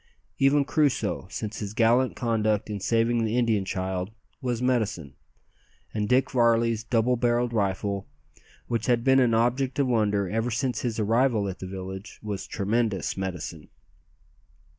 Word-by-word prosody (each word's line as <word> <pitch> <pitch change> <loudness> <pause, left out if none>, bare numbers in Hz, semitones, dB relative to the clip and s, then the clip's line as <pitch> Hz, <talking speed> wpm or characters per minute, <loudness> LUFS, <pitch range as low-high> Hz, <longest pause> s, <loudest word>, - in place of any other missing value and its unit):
Even 140 +1 +4
Crusoe, 125 - 0
since 105 0 -5
his 105 0 -5
gallant 120 +3 +3
conduct 110 -3 0
in 105 - -3
saving 115 +4 +1
the 110 +2 0
Indian 110 -5 +2
child, 95 -1 -3 0.3
was 125 -3 -1
"medicine;" 110 - -1 0.8
and 105 -1 -1
Dick 130 +1 +3
Varley's 115 -2 +2
double 115 +1 +2
barrelled 120 0 +1
rifle, 100 -1 -1 0.6
which 115 -2 -2
had 120 -2 +2
been 130 +1 +5
an 120 -3 +3
object 125 +3 +1
of 140 - +3
wonder 105 -5 +1
ever 115 +5 -1
since 125 +2 -1
his 115 -3 -2
arrival 115 0 +2
at 95 -1 -5
the 95 - -6
village, 95 +2 -7
was 105 -2 -4
tremendous 110 -1 -1
"medicine!" 90 -4 -5
115 Hz, 145 wpm, -26 LUFS, 100-120 Hz, 0.8 s, been